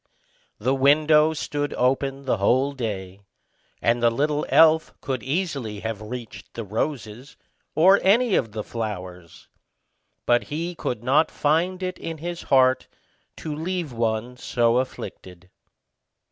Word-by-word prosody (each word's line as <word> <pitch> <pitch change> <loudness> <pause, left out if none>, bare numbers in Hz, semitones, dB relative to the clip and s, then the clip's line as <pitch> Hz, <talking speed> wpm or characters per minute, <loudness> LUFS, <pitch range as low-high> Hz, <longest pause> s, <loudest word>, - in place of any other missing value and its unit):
The 125 +5 0
window 150 +3 +4
stood 145 -1 -3
open 135 +2 0
the 125 - +1
whole 130 +8 +2
day, 100 -7 -5 0.6
and 120 +1 +2
the 120 - +5
little 145 +5 -1
elf 160 0 +5
could 130 -3 -3
easily 135 - -3
have 110 -2 -4
reached 115 +1 -8
the 115 - -4
roses, 115 +3 -4 0.4
or 190 +5 +6
any 225 +3 +3
of 115 - +1
the 105 0 -4
flowers; 90 -7 -7 0.8
but 120 -2 +3
he 165 +7 -4
could 120 -8 -4
not 145 +5 +3
find 175 +5 0
it 185 0 -4
in 165 -1 -5
his 170 +2 -5
heart 130 -1 +3 0.5
to 155 - -5
leave 165 -2 -3
one 115 +1 -2
so 120 -2 +1
afflicted. 95 -7 -6
130 Hz, 130 wpm, -24 LUFS, 115-155 Hz, 0.8 s, or